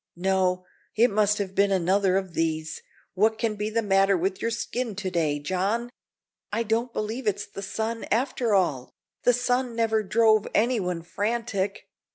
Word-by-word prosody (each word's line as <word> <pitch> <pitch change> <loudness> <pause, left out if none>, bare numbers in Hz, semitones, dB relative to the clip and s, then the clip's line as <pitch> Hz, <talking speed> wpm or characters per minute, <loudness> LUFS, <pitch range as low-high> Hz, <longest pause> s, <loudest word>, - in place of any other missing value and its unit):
No, 185 0 +1 0.3
it 230 +3 +4
must 210 0 +2
have 195 -2 -3
been 200 +1 +3
another 190 +1 +2
of 190 -3 -3
these 160 -1 -2 0.3
what 220 +3 +2
can 225 -1 0
be 210 0 -3
the 230 +1 0
matter 195 -1 +3
with 190 +2 -2
your 230 - 0
skin 230 -1 -3
to 190 -2 -3
day, 155 -4 +1
John? 195 +10 -1 0.6
I 225 +3 0
don't 230 +2 0
believe 225 +3 -4
it's 205 0 0
the 200 -1 -9
sun, 220 +3 -3
after 240 -2 +1
all. 145 -10 +1 0.4
The 245 - +6
sun 245 0 0
never 225 -1 +2
drove 215 +1 +3
anyone 200 -7 +1
frantic. 205 +1 -2
205 Hz, 165 wpm, -26 LUFS, 190-230 Hz, 0.6 s, The